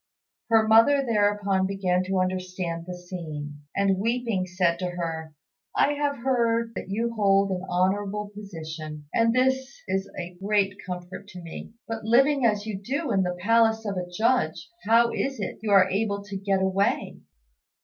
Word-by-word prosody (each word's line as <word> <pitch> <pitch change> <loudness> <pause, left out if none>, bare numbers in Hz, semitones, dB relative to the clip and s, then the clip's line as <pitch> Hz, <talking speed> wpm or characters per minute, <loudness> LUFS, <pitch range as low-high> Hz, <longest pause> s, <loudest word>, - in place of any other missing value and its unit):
Her 225 -1 +4
mother 250 +6 +5
thereupon 205 -4 +2
began 185 -2 0
to 190 0 0
understand 185 -2 -3
the 180 0 -6
scene, 155 -5 -7
and, 195 -1 +2
weeping, 230 -4 0
said 175 -2 +1
to 180 -1 -2
her, 165 -3 -5 0.4
"I 290 - +3
have 290 -1 -1
heard 230 -3 +1
that 190 - -6
you 230 +4 -1
hold 195 -2 +3
an 185 -1 -2
honourable 200 +3 0
position, 160 -6 -8
and 230 0 +3
this 265 +2 +1
is 190 +1 -1
a 175 0 -7
great 200 -1 +1
comfort 180 +2 -7
to 180 -3 -10
me; 165 +6 -9
but, 225 -1 -4
living 265 +4 +4
as 210 -1 0
you 205 -3 -5
do 280 +5 -2
in 195 -3 +3
the 180 -1 -1
palace 225 +1 +3
of 200 -2 -2
a 180 -1 -4
Judge, 180 - 0 0.2
how 230 +1 +5
is 270 -3 -2
it 195 - -4
you 220 - -3
are 195 -2 +6
able 200 +1 -1
to 200 -1 -8
get 195 0 0
away?" 190 +1 0
195 Hz, 170 wpm, -26 LUFS, 180-225 Hz, 0.4 s, are